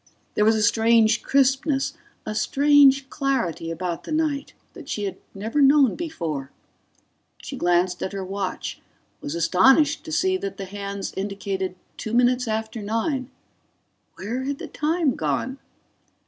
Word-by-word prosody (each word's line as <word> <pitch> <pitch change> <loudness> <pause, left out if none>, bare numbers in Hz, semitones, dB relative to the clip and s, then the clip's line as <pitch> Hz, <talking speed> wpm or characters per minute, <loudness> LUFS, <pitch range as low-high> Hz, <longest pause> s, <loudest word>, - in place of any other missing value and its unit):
There 210 - +2
was 220 +1 +5
a 215 - +1
strange 225 0 +4
crispness, 270 +1 +2 0.3
a 215 - -3
strange 275 +2 +4
clarity 235 - -1
about 170 +1 -4
the - - -8
night, 310 -3 -1 0.2
that 325 -7 -11
she 210 - -3
had 195 - -3 0.2
never 220 +9 -1
known 275 -3 +5
before... 165 - -4 0.9
She - - -6
glanced 175 +1 +1
at - - -2
her 195 -1 -5
watch, 195 0 -4 0.4
was 145 - -4
astonished 265 - +4
to 320 - -7
see 375 +4 +2
that 395 0 -5
the 195 - -5
hands 200 0 -5
indicated 195 -1 -3 0.2
two 220 - -5
minutes 250 0 +3
after 220 0 -3
nine. 245 +5 -2 0.9
Where 240 +7 -4
had 280 0 -2
the - - -7
time 310 -2 0
gone? 155 - -2
225 Hz, 145 wpm, -24 LUFS, 195-275 Hz, 0.9 s, was